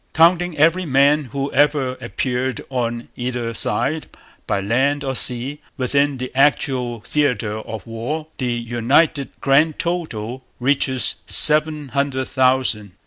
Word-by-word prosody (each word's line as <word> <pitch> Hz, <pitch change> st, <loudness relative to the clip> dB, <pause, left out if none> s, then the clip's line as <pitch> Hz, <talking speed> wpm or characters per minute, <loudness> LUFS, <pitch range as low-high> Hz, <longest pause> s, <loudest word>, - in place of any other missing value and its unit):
Counting 170 Hz, +1 st, +3 dB
every 165 Hz, +4 st, +3 dB
man 140 Hz, +2 st, +3 dB
who 140 Hz, +2 st, -4 dB
ever 145 Hz, -1 st, +2 dB
appeared 130 Hz, -1 st, -3 dB
on 120 Hz, -2 st, -3 dB
either 120 Hz, -2 st, -3 dB
side, 140 Hz, +8 st, -1 dB, 0.4 s
by -, -, 0 dB
land 135 Hz, +8 st, 0 dB
or 135 Hz, -1 st, -3 dB
sea, 125 Hz, +4 st, +3 dB, 0.2 s
within 140 Hz, +1 st, +1 dB
the 130 Hz, 0 st, -5 dB
actual 130 Hz, -4 st, +1 dB
theatre 115 Hz, -5 st, -1 dB
of 110 Hz, 0 st, -8 dB
war, 120 Hz, +8 st, -4 dB
the 125 Hz, -2 st, -1 dB
united 120 Hz, +5 st, +1 dB
grand 150 Hz, +3 st, +3 dB
total 130 Hz, -9 st, -4 dB, 0.2 s
reaches 130 Hz, 0 st, +1 dB
seven 150 Hz, -1 st, +4 dB
hundred 140 Hz, -1 st, -1 dB
thousand. 130 Hz, -6 st, +1 dB
130 Hz, 125 wpm, -20 LUFS, 120-145 Hz, 0.4 s, seven